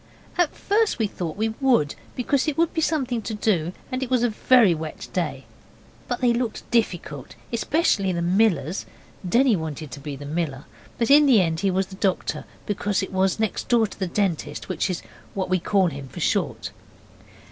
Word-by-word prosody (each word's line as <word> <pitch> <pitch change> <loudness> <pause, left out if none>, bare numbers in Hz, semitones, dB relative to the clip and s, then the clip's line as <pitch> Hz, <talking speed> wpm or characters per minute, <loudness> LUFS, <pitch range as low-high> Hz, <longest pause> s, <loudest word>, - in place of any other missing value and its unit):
At 350 -3 +1
first 430 +1 +1
we 225 - +1
thought 175 -4 -4
we 220 +1 +1
would, 240 - +3 0.2
because 260 +3 +1
it 305 - -1
would 335 0 +2
be 320 - 0
something 260 -7 0
to 220 +1 -4
do, 180 -6 +1 0.2
and 255 0 -2
it 260 - -2
was 250 -2 +2
a 245 - +3
very 225 -3 +5
wet 155 -1 -6
day; - - -2 0.6
but 245 0 -3
they 245 -2 +4
looked 235 -2 -3
difficult, 175 - -1 0.2
especially 230 - +1
the 170 -1 -1
Miller's. 180 -3 +1 0.4
Denny 245 +2 +4
wanted 155 -4 -5
to 145 - -7
be 145 0 -6
the 145 +1 -9
Miller, 145 -3 -3 0.3
but 235 +3 +1
in 295 +1 +8
the 250 -6 +6
end 165 -3 +1
he 195 +2 +1
was 190 +1 +1
the 190 - -11
Doctor, 190 -2 -1 0.2
because 205 -1 -1
it 190 - -6
was 190 +1 +1
next 220 -4 -1
door 235 -2 +4
to 195 -2 -4
Dentist, 175 -5 -2
which 185 +1 -1
is 180 - -3 0.3
what 190 -2 -2
we 185 - +3
call 195 +2 +2
him 140 -2 -8
for - - -9
short. - - -1
200 Hz, 190 wpm, -24 LUFS, 170-245 Hz, 0.6 s, in